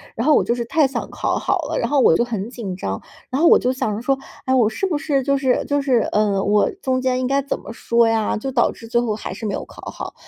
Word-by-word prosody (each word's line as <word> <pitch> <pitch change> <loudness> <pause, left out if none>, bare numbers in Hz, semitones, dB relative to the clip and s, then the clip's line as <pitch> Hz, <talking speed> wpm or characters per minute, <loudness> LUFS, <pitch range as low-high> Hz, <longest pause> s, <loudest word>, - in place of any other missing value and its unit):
然 230 - -2
后 305 - +6
我 - - +4
就 235 - 0
是 240 - -2
太 295 +3 +2
想 270 - -5
考 - - -1
好 - - 0
了， - - -3
然 235 - -1
后 290 -1 +2
我 165 - +5
就 - - +2
很 225 -2 -4
紧 215 -7 -6
张， 95 - -4 0.3
然 265 +4 -1
后 340 - +6
我 - - +8
就 250 - +1
想 220 -5 -2
着 215 - -5
说， 270 +2 +1 0.3
哎 260 - +1
我 230 -4 +4
是 225 - -2
不 350 -6 0
是 290 -3 0
就 275 +1 +1
是 260 -2 +1
就 285 0 0
是 260 -4 +2
呃， 205 -2 +2
我 205 0 +3
中 260 -1 0
间 255 -1 0
应 250 - 0
该 275 +1 +1
怎 275 - -3
么 - - -10
说 235 0 +2
呀， 225 -1 +1
就 265 +5 -4
导 240 -2 +2
致 230 - -12
最 235 +1 +1
后 230 -3 -1
还 210 - -6
是 220 - -7
没 200 - -2
有 - - -3
考 - - -14
好。 - - -7
245 Hz, 315 characters per minute, -21 LUFS, 220-270 Hz, 0.3 s, 我